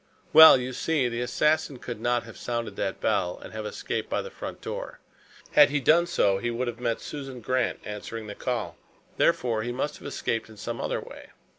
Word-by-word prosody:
"Well, 160 -3 +11
you 125 +1 -4
see, 150 -2 +1
the 120 0 -3
assassin 150 +3 +1
could 120 -2 -7
not 120 0 +1
have 115 -2 -12
sounded 115 -4 -4
that 95 -1 -3
bell 90 - 0
and - - -11
have 110 -1 -4
escaped - - -4
by - - -1
the - - -8
front - - -7
door. - - -6 0.5
Had - - +7
he 145 0 0
done 165 +5 +4
so, 100 - +2
he 120 - -2
would 120 +2 -2
have 120 -1 -5
met 120 -2 -1
Susan 135 -3 -7
Grant 130 +1 -1
answering 105 +2 -6
the 105 - -6
call. 120 -1 -3 0.4
Therefore, 115 -3 +2
he 120 +2 -3
must 145 +4 -3
have - - -8
escaped 115 -5 -2
in 110 - -14
some 115 +3 -5
other - - -1
way. - - -11
120 Hz, 205 wpm, -27 LUFS, 110-130 Hz, 0.5 s, Well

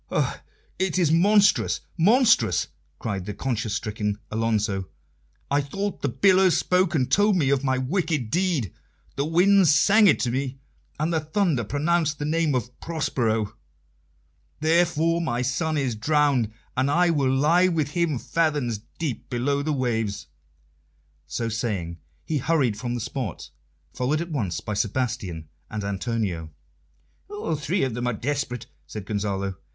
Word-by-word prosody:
"Oh, - - -1 0.4
it 190 -2 0
is 170 -4 +3
monstrous, 200 +5 +4
monstrous!" 225 - +3 0.3
cried 100 -2 -4
the 105 - -4
conscience 115 -5 -2
stricken 105 -2 -2
Alonso. 105 -4 0 0.6
"I 145 +1 +3
thought 195 +8 -4
the 140 - 0
billows 185 +8 +4
spoke 180 -2 +2
and 130 -4 +2
told 205 0 +4
me 145 -7 +2
of 140 -1 +1
my 130 -1 +1
wicked 150 - -1
deed, 170 - 0 0.4
the 140 - -1
winds 185 +2 +5
sang 210 +7 +5
it 170 - +4
to 120 - 0
me, 130 +1 -2 0.4
and 160 +3 0
the 160 - +2
thunder 155 - 0
pronounced 155 +5 0
the 145 - -3
name 155 -2 +1
of 125 0 -4
'Prospero.' 115 -10 -1 1.1
Therefore 165 +1 +2
my 125 -7 -1
son 155 +5 -1
is 135 -4 0
drowned, 140 -1 +2 0.2
and 130 +2 +1
I 175 +4 +3
will 140 -5 +1
lie 155 +7 +4
with 155 -5 -1
him 170 -4 0
fathoms 145 -7 0 0.2
deep 155 -8 -4
below 140 +4 0
the 155 +2 -1
waves." 115 -7 -1 1.0
So 115 - -3
saying, 100 -7 -3 0.3
he 155 -2 -1
hurried 135 -6 +1
from 120 +3 -3
the 120 - -3
spot, 120 - -5 0.4
followed 135 +5 0
at 170 0 -5
once 100 - -2
by 105 - -4
Sebastian 105 -7 -2 0.2
and 105 -1 -4
Antonio. 100 -5 -2 0.8
"All 415 - -3
three 155 +6 -1
of 130 -3 -1
them 120 +1 -2
are 125 - 0
desperate," 125 0 -3 0.2
said 105 -3 -7
Gonzalo. 100 -2 -2
140 Hz, 150 wpm, -25 LUFS, 115-165 Hz, 1.1 s, winds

